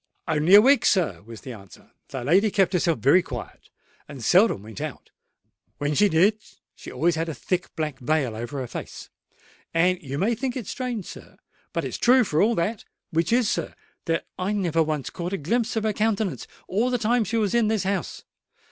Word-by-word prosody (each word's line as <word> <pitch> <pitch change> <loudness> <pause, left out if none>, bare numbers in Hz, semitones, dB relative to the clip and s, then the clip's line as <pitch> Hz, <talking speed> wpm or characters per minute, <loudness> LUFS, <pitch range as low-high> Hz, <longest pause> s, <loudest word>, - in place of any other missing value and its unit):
"Only 160 +5 +4
a 205 - +10
week, 275 0 +5
sir," 155 - +1
was 115 -2 -10
the 130 - -8
answer. 100 -4 -15 0.2
"The 130 - -6
lady 190 - +3
kept 195 -2 +1
herself 170 -3 +1
very 140 - +4
quiet, 125 -8 -9 0.4
and 135 -6 -8
seldom 185 - +4
went 110 -2 -9
out. - - -7 0.7
When 145 +1 -1
she 205 +6 +4
did, 195 +6 +3 0.3
she - - -11
always 170 +6 +1
had 165 +1 -2
a 160 - -5
thick 180 +7 -3
black 155 -3 -3
veil 130 -3 0
over 120 +6 -5
her - - -3
face; - - -8 0.6
and, 180 +2 +2
you 140 -1 -5
may 210 +9 +1
think 250 +2 -3
it 240 - -5
strange, 240 -3 -4
sir—but - - -9
it's - - -5
true 250 +1 +5
for 155 -7 0
all 225 +3 +3
that—which 170 -3 -3
is, 240 -1 +3
sir, - - -2 0.3
that 165 -1 -1
I 190 +3 -1
never 175 -5 +1
once 155 -4 -2
caught 175 +2 -5
a - - 0
glimpse 230 +9 -1
of 220 - -1
her 215 -1 0
countenance 215 -2 -1 0.2
all 220 +7 +1
the 250 - +1
time 235 +1 +1
she 220 +3 -2
was 210 -4 0
in 235 -2 +3
this 220 -2 0
house. 190 -2 -3
180 Hz, 200 wpm, -24 LUFS, 150-220 Hz, 0.7 s, a